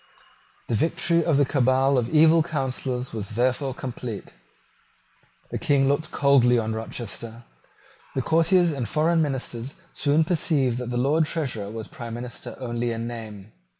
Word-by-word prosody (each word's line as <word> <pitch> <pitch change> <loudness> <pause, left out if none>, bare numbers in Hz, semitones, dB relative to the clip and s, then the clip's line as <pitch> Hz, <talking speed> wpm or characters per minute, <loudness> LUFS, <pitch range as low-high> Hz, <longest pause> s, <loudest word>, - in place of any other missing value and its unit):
The - - -2
victory 170 +5 +2
of 160 -5 +2
the 145 - +4
cabal 130 +1 +2
of 120 -2 +1
evil 160 +1 +6
counsellors 130 -4 -2
was 105 -1 -5
therefore 130 +2 0
complete. 120 - -6 1.2
The - - -3
King 135 -2 +2
looked 145 +3 0
coldly 135 -3 +4
on 110 -1 -1
Rochester. 115 +1 -6 0.7
The 130 - 0
courtiers 165 +4 +3
and 135 -6 -3
foreign 165 +1 +2
ministers 130 -3 -3 0.2
soon 150 +2 +3
perceived 150 -7 +1
that 125 -1 -4
the 120 - -2
Lord 150 +5 +2
Treasurer 125 -12 -3
was 110 0 -6
prime 115 -1 -7
minister 120 0 -7
only 120 -2 -2
in 115 0 -3
name. 110 -3 -8
130 Hz, 150 wpm, -25 LUFS, 120-150 Hz, 1.2 s, evil